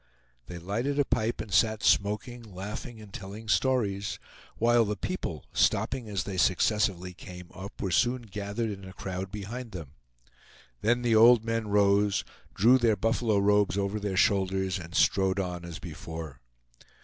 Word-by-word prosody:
They 90 - -7
lighted 115 +11 -2
a 145 - +3
pipe 110 -1 -1
and 105 -3 -7
sat 110 +3 +3
smoking, 105 +4 +1
laughing, 105 +3 -7
and 105 -2 -13
telling 100 +4 -8
stories, 105 -5 +1 0.4
while 120 +1 +4
the 105 -1 -2
people, 100 - -4
stopping 125 -4 +1
as 100 -2 -2
they 95 -2 -5
successively 90 0 +1
came 90 -1 -11
up, 95 +1 -9
were 95 - -2
soon 120 +6 +2
gathered 105 +2 -4
in 100 -1 -8
a 95 0 -10
crowd 95 0 -5
behind 110 +3 -6
them. 80 -7 -7 0.9
Then 120 +3 +2
the 115 -2 +3
old 115 0 +7
men 115 -1 -1
rose, 100 0 +3 0.3
drew 120 +6 +5
their 115 -3 +3
buffalo 115 0 +1
robes 100 0 +3
over 100 +1 -1
their 100 -2 -3
shoulders, 95 -2 +1
and 85 -1 -9
strode 95 0 +3
on 90 -2 -3
as 85 -1 -7
before. 80 -5 -8
100 Hz, 160 wpm, -28 LUFS, 95-115 Hz, 0.9 s, old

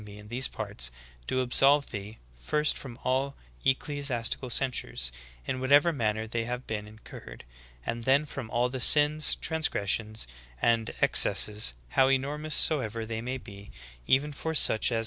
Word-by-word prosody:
e 100 0 -11
in 105 0 -13
these 125 +3 0
parts, - - -3 0.4
do 130 - 0
absolve 140 +3 +3
thee, 105 +2 -7 0.2
first 150 - +1
from 120 -4 -9
all 135 +2 -1 0.3
ecclesi 145 +1 0
astical 120 +1 -2
censures, 125 - -1 0.3
in 130 - -3
whatever 145 +6 +4
manner 110 -4 -1
they 115 +1 -3
have 125 +1 -5
been 105 -1 -5
in 110 +1 -14
curred; - - -11 0.4
and 115 0 -4
then 135 +4 +3
from 135 -5 -7
all 120 +2 +1
the 130 0 -5
sins, 150 +3 +5
transgressions, 110 -8 -2 0.3
and 115 -1 +1
ex - - +5
cesses, 105 - +1 0.2
how 130 - +3
enormous 145 +3 -1
soever 115 -8 +2
they 110 0 -5
may 125 +2 -4
be, 100 -4 -12 0.4
even 140 +3 +2
for 160 +3 -5
such 110 -5 +5
as 115 - 0
a. - - 0
125 Hz, 165 wpm, -28 LUFS, 110-140 Hz, 0.4 s, sins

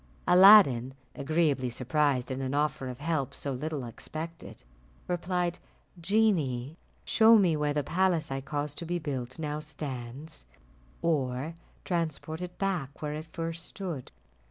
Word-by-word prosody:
Aladdin, 180 - +7 0.2
agreeably 145 -3 +1
surprised 135 +1 0
at 130 - -3
an 135 +1 -2
offer 150 -2 0
of 125 -1 -6
help 150 -3 -1
so 140 - -4
little 150 +1 -3
expected, 160 +8 -8 0.4
replied, 175 0 -1 0.4
"Genie, 165 - +1 0.3
show 225 +1 +6
me 180 -6 +3
where 150 -1 0
the 145 - +1
palace 175 -4 +1
I 135 0 -2
caused 145 +1 -4
to 170 - -5
be 175 +1 0
built 130 -6 -4
now 150 -2 -3
stands, 145 -1 -6 0.6
or 140 -2 0 0.3
transport 160 -1 -2
it 180 0 -6
back 175 -9 -2
where 150 0 -2
it 155 +2 -6
first 165 0 -4
stood." 170 -11 -6
150 Hz, 135 wpm, -29 LUFS, 135-170 Hz, 0.6 s, Aladdin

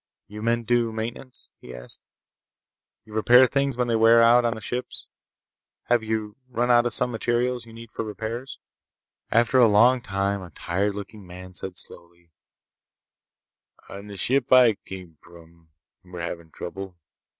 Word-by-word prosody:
"You 105 +1 -10
men 115 +1 0
do 120 0 +1
maintenance?" 115 +3 -7
he 60 - -11
asked. - - -10 1.0
"You 110 - -14
repair 120 +4 +6
things 140 0 -1
when 125 -1 0
they 115 - +1
wear 115 +1 +6
out 120 +1 +6
on 115 -1 0
the - - -7
ships? 125 +3 -5 0.8
Have 120 -1 +3
you 110 -1 -3
run 120 0 0
out 120 0 +5
of 120 - -2
some 125 +2 0
materials 120 +1 -1
you - - -13
need 115 0 -12
for - - -4
repairs?" 110 +4 -6 0.7
After 120 +3 +3
a 120 - +7
long 120 +5 +5
time 100 -2 -2
a 90 - -10
tired 95 +6 -2
looking 100 -1 -9
man 90 +1 -11
said 90 0 -7
slowly: 85 -1 -14 1.6
"On 100 +1 -9
the 100 -1 -9
ship 130 +6 0
I 125 -3 +7
come 90 -5 -11
from, 85 -1 -18 0.3
we're 90 -1 -9
having 85 -1 -6
trouble. 95 +2 -8
110 Hz, 160 wpm, -24 LUFS, 95-120 Hz, 1.6 s, a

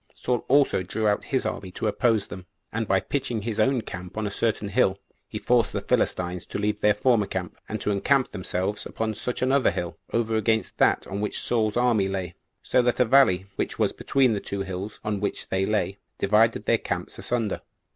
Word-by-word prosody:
Saul 125 -2 -1
also 140 -7 +4
drew 105 +4 -1
out 105 0 +1
his 130 - -1
army 95 - -3
to - - -4
oppose 110 -1 +2
them; 90 -1 -9 0.3
and 115 0 -1
by 95 0 +3
pitching 120 -2 -2
his 110 -1 -3
own 130 -2 +3
camp 90 -1 -8
on 110 - -1
a 100 - -2
certain 110 -1 -1
hill, 95 -1 +2 0.3
he - - -6
forced - - +2
the - - -2
Philistines 90 0 0
to - - -4
leave 105 0 -1
their 105 -1 +4
former 110 -2 +2
camp, 90 -2 -4
and 110 - -3
to 105 - 0
encamp 130 +7 +2
themselves 95 +1 -2
upon 110 -1 -2
such 125 +4 -3
another 130 +1 +3
hill, 85 -1 -4
over 115 -1 0
against 110 +1 0
that - - +3
on 100 +1 -4
which 105 - -2
Saul's 110 -2 0
army 120 -5 +3
lay, 95 -2 -3 0.3
so 125 - +3
that 120 0 0
a 125 - +5
valley, 110 -8 +4
which - - -2
was - - +2
between 130 -4 +2
the 105 - -1
two 100 0 -4
hills 95 +2 -6
on 105 -1 -1
which 100 0 -3
they 95 0 0
lay, 105 -2 -1 0.2
divided 110 +3 +3
their - - +3
camps - - -4
asunder. 115 -4 -1
105 Hz, 205 wpm, -25 LUFS, 95-120 Hz, 0.3 s, a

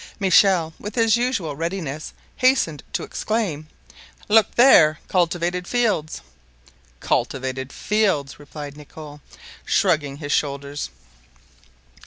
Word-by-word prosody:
Michel, 185 -4 +3
with 205 +1 -7
his 225 -2 +3
usual 235 - -1
readiness, 160 -2 -4 0.3
hastened 255 - +2
to - - -3
exclaim: 190 -9 -3 0.6
"Look 215 -1 +3
there! 165 - +6
cultivated 175 0 0
fields!" 215 - -1 0.8
"Cultivated 130 0 -2
fields!" 195 -10 -1
replied 145 -1 -9
Nicholl, 150 0 -12 0.4
shrugging 150 -7 +1
his 145 -1 -6
shoulders. 140 -1 -2
165 Hz, 95 wpm, -22 LUFS, 145-205 Hz, 0.8 s, there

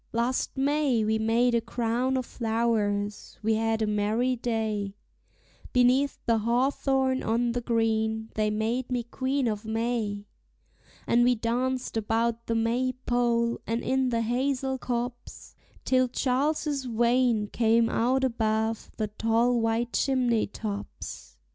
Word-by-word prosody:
Last 240 +4 -1
May 275 -4 +2
we 220 +1 +1
made 230 +3 +2
a 235 - +3
crown 240 +3 -1
of 255 - -2
flowers; 220 -3 -1
we 220 +1 +2
had 225 0 0
a - - +2
merry 215 +4 +1
day, 220 -4 -2 0.8
Beneath 255 +3 +3
the 230 -2 +3
hawthorn 260 +3 +1
on 235 +2 +1
the 245 +1 -2
green 220 -1 0
they 215 -1 +1
made 225 +4 -1
me 245 -1 0
Queen 260 +2 -1
of 210 -1 -2
May; 220 -2 -2 0.8
And 240 +1 +3
we 245 0 +4
danced 245 +2 -1
about 225 +1 -1
the 230 - 0
May 240 +3 +1
pole 235 -1 +1
and 230 +1 -1
in 260 0 +1
the 230 -1 0
hazel 265 +3 -1
copse, 245 0 -5 0.3
Till 255 0 +3
Charles's 280 +2 0
Wain 235 -1 +2
came 230 0 +3
out 255 +4 +1
above 220 -2 0
the 215 -2 -1
tall 230 +3 +1
white 225 +1 0
chimney 250 -4 +1
tops. 205 -1 -7
235 Hz, 135 wpm, -27 LUFS, 225-255 Hz, 0.8 s, we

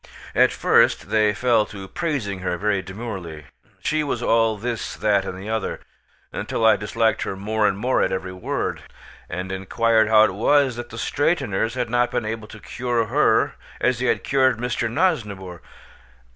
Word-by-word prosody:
At - - +4
first - - +2
they 110 -1 +3
fell 115 0 +2
to 100 -2 -9
praising 115 - -3
her 90 -1 -2
very 100 0 0
demurely. 95 -7 -7 0.4
She 155 0 +1
was 145 - -3
all 115 -1 +2
this 115 +1 -4
that 100 -2 +1
and 90 - -5
the 95 +3 -8
other, 110 -2 -2 0.7
till 115 - 0
I 110 - +7
disliked 110 +2 0
her - - -3
more 105 +2 0
and 95 - 0
more 125 +5 +1
at - - +1
every 95 0 -3
word, 90 - -3 0.5
and 90 +1 -4
inquired 110 +4 +2
how 110 -1 +6
it 110 - +2
was 130 +5 +3
that 120 0 -7
the 115 - -9
straighteners 125 - 0
had 120 -2 -2
not 120 0 +2
been 110 - -2
able 110 0 -4
to 110 - -12
cure 120 0 -2
her - - +3 0.3
as 125 -2 +1
they 130 - 0
had - - +1
cured 130 -3 +2
Mr. 120 0 -2
Nosnibor. 105 - -1
110 Hz, 175 wpm, -22 LUFS, 100-120 Hz, 0.7 s, I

